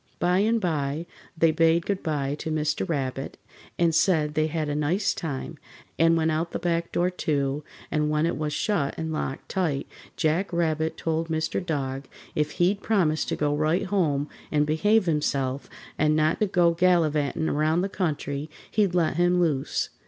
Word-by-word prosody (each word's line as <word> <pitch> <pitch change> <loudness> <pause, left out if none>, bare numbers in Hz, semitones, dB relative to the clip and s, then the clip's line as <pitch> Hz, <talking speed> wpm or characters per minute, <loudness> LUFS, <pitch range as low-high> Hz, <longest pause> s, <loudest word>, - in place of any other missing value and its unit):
By 180 +1 +2
and 225 +3 +2
by 155 -4 -1 0.3
they 165 0 +4
bade 165 +1 +3
goodby 150 -8 -1
to - - -4
Mr. 155 +3 -1
Rabbit 135 -3 -3 0.4
and 170 -1 +3
said 155 -2 +2
they'd 155 +1 +1
had 155 -1 -2
a 145 - -1
nice 160 +7 +1
time, 150 -1 -5 0.4
and 165 +1 +5
went 160 0 +2
out 160 +2 -2
the - - 0
back 170 -1 -1
door, 180 +1 +1
too, 145 -4 -1 0.3
and 150 0 +1
when 150 +1 +1
it 170 - 0
was 150 -1 -2
shut 150 -3 0
and 160 -1 -3
locked 135 -3 -4
tight 165 -8 -1 0.3
Jack 165 +6 +1
Rabbit 160 -2 0
told 165 0 -1
Mr. 160 +3 -1
Dog 135 -5 -3 0.3
if 150 0 -1
he'd 190 +4 +1
promise 170 -8 +2
to - - -2
go 145 -1 0
right 155 +4 +1
home 155 -8 +1 0.2
and 150 -1 +3
behave 205 +8 +3
himself, 140 -4 -1 0.3
and 150 0 +3
not 155 +6 +1
go 175 -3 +4
gallivanting 160 -4 +2
around 155 +3 +1
the 190 - 0
country, 150 -6 -3 0.2
he'd 200 -4 +2
let 165 -2 +1
him 175 0 +3
loose. 150 -6 0
160 Hz, 170 wpm, -26 LUFS, 150-175 Hz, 0.4 s, and